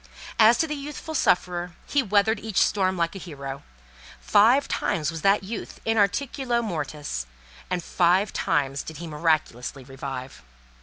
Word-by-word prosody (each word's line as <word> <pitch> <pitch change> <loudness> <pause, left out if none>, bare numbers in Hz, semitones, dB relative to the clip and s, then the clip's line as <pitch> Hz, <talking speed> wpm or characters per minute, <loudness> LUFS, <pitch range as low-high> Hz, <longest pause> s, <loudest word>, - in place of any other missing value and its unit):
As 225 +2 +7
to 325 - +2
the 300 - -3
youthful 295 +2 -6
sufferer, 180 - +1
he 285 - +2
weathered 210 -1 +2
each 215 -3 -1
storm 190 -2 +2
like 170 -1 0
a - - -5
hero. 140 -6 -7 0.6
Five 230 - +4
times 165 -6 -1
was 165 -1 -6
that 195 +2 +3
youth 215 +3 -6
"in 225 - +2
articulo 240 +3 +1
mortis," 150 - -4 0.4
and 180 -2 -1
five 185 +4 +2
times 140 -2 0
did 160 - -8
he 170 - -7
miraculously 150 -5 -1
revive. 135 - -7
180 Hz, 150 wpm, -25 LUFS, 150-220 Hz, 0.6 s, As